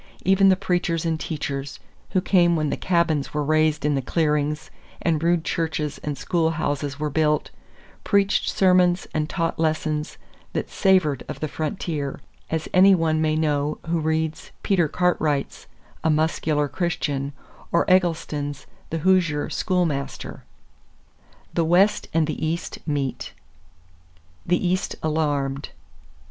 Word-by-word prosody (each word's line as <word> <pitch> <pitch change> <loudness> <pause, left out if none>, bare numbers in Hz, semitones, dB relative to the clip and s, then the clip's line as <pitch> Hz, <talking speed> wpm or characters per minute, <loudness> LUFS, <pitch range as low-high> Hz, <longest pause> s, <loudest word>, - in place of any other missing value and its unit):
Even 195 +1 +5
the 190 - +5
preachers 175 -3 -1
and 160 -1 0
teachers, 145 -4 -4 0.3
who 185 - +1
came 175 -3 +4
when 155 -2 0
the - - 0
cabins 170 -6 0
were 150 - +1
raised 155 0 +2
in 150 - +2
the 135 - 0
clearings 150 0 0 0.3
and 160 -3 0
rude 170 0 +2
churches 160 -3 -2
and 145 -2 -4
schoolhouses 150 -4 -1
were 150 -1 -2
built, 150 0 +1 0.5
preached 200 -1 +2
sermons 180 -1 +3
and 155 0 -1
taught 165 -3 -2
lessons 155 -1 -1 0.4
that - - -3
savored 185 - +2
of - - -5
the 155 - -2
frontier, 155 -3 -3 0.3
as 160 -1 -2
any 190 +1 +7
one 160 -2 +1
may 155 -1 +1
know 150 -1 0
who 170 0 0
reads 160 0 -1
Peter 180 -5 +2
Cartwright's 155 -4 0 0.4
A 160 - +2
Muscular 155 -1 +1
Christian 145 -3 -2 0.4
or 170 - +2
Eggleston's 155 -6 0 0.2
The 165 -1 -3
Hoosier 170 -6 +2
Schoolmaster. 165 -7 -2 1.1
THE 170 - +2
WEST 185 +5 +3
AND 165 -1 +2
THE 155 - -4
EAST 165 +2 -3
MEET 140 -3 -2 1.1
=The 180 +1 +2
East 185 +2 -1
Alarmed. 145 -3 -1
160 Hz, 130 wpm, -23 LUFS, 150-175 Hz, 1.1 s, any